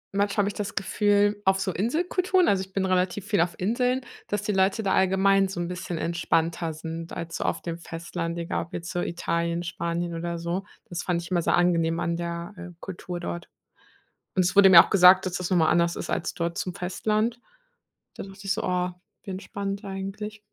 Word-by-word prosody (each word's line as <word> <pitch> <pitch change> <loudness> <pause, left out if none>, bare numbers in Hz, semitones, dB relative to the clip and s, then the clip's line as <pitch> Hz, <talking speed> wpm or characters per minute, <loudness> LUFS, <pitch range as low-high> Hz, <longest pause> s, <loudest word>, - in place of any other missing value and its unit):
manchmal 200 0 +1
habe - - 0
ich - - -6
das 210 +1 -4
Gefühl 205 +1 +2
auf 190 0 +3
so 190 -2 -1
Inselkulturen 355 - +1
also, 195 -1 +3
ich 190 - -13
bin 195 -1 0
relativ 185 +1 0
viel 205 -6 +2
auf 170 -1 0
Inseln, 250 +6 +1 0.3
dass 205 0 -2
die 210 - 0
Leute 195 +3 +2
da 195 - +1
allgemein 195 +1 +4
so 185 -2 -6
'n 170 - -2
bisschen 180 -1 -4
entspannter 165 -1 0
sind 165 +1 -6
als 165 -1 -5
so - - -3
auf - - -1
dem 170 -1 -4
Festland, 170 0 -5
egal 170 -1 -2
ob - - -24
jetzt 170 +1 -5
so 175 - -2
Italien, 170 0 -1
Spanien 170 0 -3
oder 170 0 -3
so. 170 +4 -3 0.2
Das 175 -1 -5
fand 170 -2 0
ich 170 - -10
immer 175 -1 +2
sehr - - +2
angenehm 170 -1 +2
an 170 0 0
der, 170 +2 -4
äh, 180 0 -8
Kultur 180 -1 -6
dort. 175 0 -5 0.9
Und 185 - +4
es 180 +1 0
wurde 195 -1 +8
mir 170 -2 +10
auch - - -9
gesagt, 185 0 +7
dass 180 - -3
das 180 0 -3
noch 185 - +3
mal 160 -1 +4
anders 170 0 +2
ist - - -5
als 175 - -1
dort 170 0 -3
zum 180 -1 -3
Festland. 215 +6 -1 0.8
Da - - -6
dachte 195 0 -12
ich 195 - +2
so: 225 - -3
„Oh, 180 0 0 0.3
wie 195 - -6
entspannt 200 +1 -5
eigentlich.“ 195 +2 -5
180 Hz, 215 wpm, -26 LUFS, 170-200 Hz, 0.9 s, mir